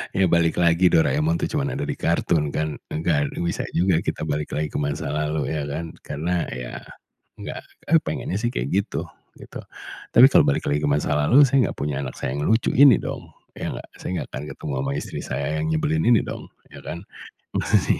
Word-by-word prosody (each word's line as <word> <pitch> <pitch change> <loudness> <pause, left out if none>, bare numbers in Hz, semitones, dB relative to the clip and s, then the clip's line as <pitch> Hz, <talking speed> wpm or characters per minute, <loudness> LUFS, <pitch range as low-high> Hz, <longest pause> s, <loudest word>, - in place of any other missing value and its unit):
ya 95 -1 +4
balik 85 -1 +3
lagi 85 +1 +4
Doraemon 150 - +2
itu 170 -2 -2
cuman 140 -2 -2
ada 140 - -2
di 145 - -2
kartun 80 -3 +1
kan, 75 -1 -2
enggak 75 -2 0 0.2
bisa 85 - -2
juga 90 -1 +3
kita 85 - -3
balik 75 -1 -3
lagi 75 0 -2
ke - - -2
masa 75 0 -2
lalu 75 0 -1
ya 75 -2 -2
kan? 80 +3 -4
Karena 85 +4 -2
ya 60 -1 -6 0.6
enggak, - - -6 0.2
eee, 165 +2 +5
pengennya 145 - -3
sih 120 +4 -1
kayak 65 - -3
gitu, 100 +1 -1 0.3
gitu, - - -9 0.5
tapi 125 +3 +8
kalau 135 - +5
balik 70 - 0
lagi 75 +1 0
ke 75 - +2
masa 75 0 +1
lalu 125 - +5
saya 135 -1 +3
enggak - - -11
punya 70 -1 -2
anak 65 - -6
saya 65 - -3
yang 75 - -2
lucu 110 +7 +1
ini 135 -4 +7
dong, - - -6 0.2
ya - - -4
gak? - - -8
Saya - - -7
enggak - - -5
akan 70 - -5
ketemu 75 - -6
sama 70 - -2
istri - - -6
saya 70 +2 -3 0.2
yang 80 - -1
nyebelin 80 0 +1
ini 120 -2 +5
dong, - - -7 0.2
ya - - -11
kan, 85 +3 -7 0.4
masa - - 0
sih. - - +1
80 Hz, 210 wpm, -23 LUFS, 75-105 Hz, 0.6 s, tapi